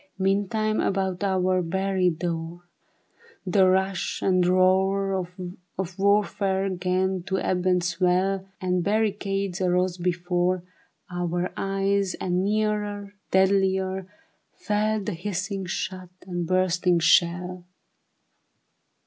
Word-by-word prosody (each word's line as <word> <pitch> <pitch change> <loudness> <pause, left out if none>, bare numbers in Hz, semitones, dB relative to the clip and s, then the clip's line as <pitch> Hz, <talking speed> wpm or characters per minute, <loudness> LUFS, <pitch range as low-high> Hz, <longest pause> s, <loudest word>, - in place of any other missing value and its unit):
Meantime 205 +3 0
about 190 -1 -1
our 185 -1 +2
very 190 +1 +1
door 170 0 -4 0.8
The 190 +1 +4
rush 190 0 0
and 185 -1 +3
roar 190 +1 +2 0.5
Of 190 0 -4
warfare 200 -1 +1
'gan 185 +1 0
to 190 - 0
ebb 185 -1 -1
and 180 -1 +3
swell, 185 +2 +1
And 180 -2 0
barricades 200 -2 -1
arose 180 0 +1
before 175 +1 0 0.5
Our 175 0 -2
eyes, 195 0 0
and 180 0 -1
nearer, 205 -1 -1 0.2
deadlier, 190 0 +2 0.5
fell 215 0 0
The 210 - -3
hissing 195 +2 -3
shot 185 0 -4 0.2
and 175 -2 -3
bursting 185 -1 +2
shell. 175 +2 +2
185 Hz, 100 wpm, -25 LUFS, 180-195 Hz, 0.8 s, The